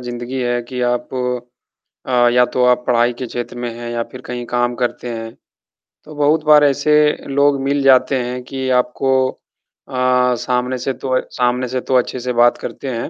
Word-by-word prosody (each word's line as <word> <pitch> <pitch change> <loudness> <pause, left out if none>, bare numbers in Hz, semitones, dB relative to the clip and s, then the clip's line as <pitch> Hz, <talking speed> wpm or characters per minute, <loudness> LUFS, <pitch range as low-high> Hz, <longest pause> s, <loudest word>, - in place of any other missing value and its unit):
ज़िंदगी 120 +1 -5
है 120 -1 0
कि 125 +1 -6
आप 120 0 -2 1.0
अ, 120 -1 +4
या 125 0 +5
तो 125 0 0
आप 125 0 +3
पढ़ाई 120 -1 +2
के 130 - -4
क्षेत्र 120 +1 -6
में 120 0 -3
हैं 120 0 -7
या 120 0 -2
फिर 130 - -9
कहीं 120 0 -5
काम 120 0 0
करते 125 0 -2
हैं, 115 -1 -6 0.7
तो 155 - -12
बहुत 150 +2 +2
बार 150 -1 +6
ऐसे 145 +1 +2 0.3
लोग 140 0 +2
मिल 140 +1 0
जाते 130 0 +4
हैं 125 +1 -4
कि 130 +1 -4
आपको 125 +2 -2 0.8
अ, - - -7 0.4
सामने 125 0 -1
से 130 +2 -2
तो 130 0 -1
सामने 125 0 0
से 130 +1 -3
तो 130 - -1
अच्छे 125 0 +1
से 125 +1 -3
बात 120 0 +4
करते 135 - -6
हैं, 115 -1 -4
125 Hz, 190 wpm, -18 LUFS, 120-130 Hz, 1.0 s, बार